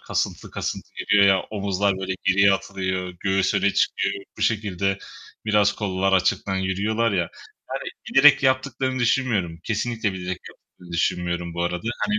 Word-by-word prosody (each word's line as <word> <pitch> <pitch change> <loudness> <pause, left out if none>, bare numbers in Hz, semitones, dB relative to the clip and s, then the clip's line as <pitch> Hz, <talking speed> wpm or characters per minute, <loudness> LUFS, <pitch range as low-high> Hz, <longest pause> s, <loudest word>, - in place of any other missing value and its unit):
kasıntı - - -3
kasıntı - - -4
geliyor 100 -1 +4
ya; 95 -1 +4
omuzlar 100 -2 0
böyle 95 0 -3
geriye 100 +1 +5
atılıyor, 95 -2 -3
göğüs 95 -1 +1
öne 100 - +3
çıkıyor, 100 0 0
bu - - -3
şekilde 100 -3 0 0.5
biraz 105 -1 +3
kollar 95 -2 -1
açıktan 95 +1 +1
yürüyorlar 100 +5 0
ya. 95 - +1 0.5
Yani - - -4 0.2
bilerek 140 0 +7
yaptıklarını 130 0 0
düşünmüyorum, 115 -9 +1
kesinlikle 110 -1 -1
bilerek 90 -1 -4
yaptıklarını 90 -1 -16
düşünmüyorum 85 0 -1
bu 85 - -2
arada. 90 +5 -2 0.2
Hani, 210 0 +1
100 Hz, 145 wpm, -23 LUFS, 95-110 Hz, 0.5 s, bilerek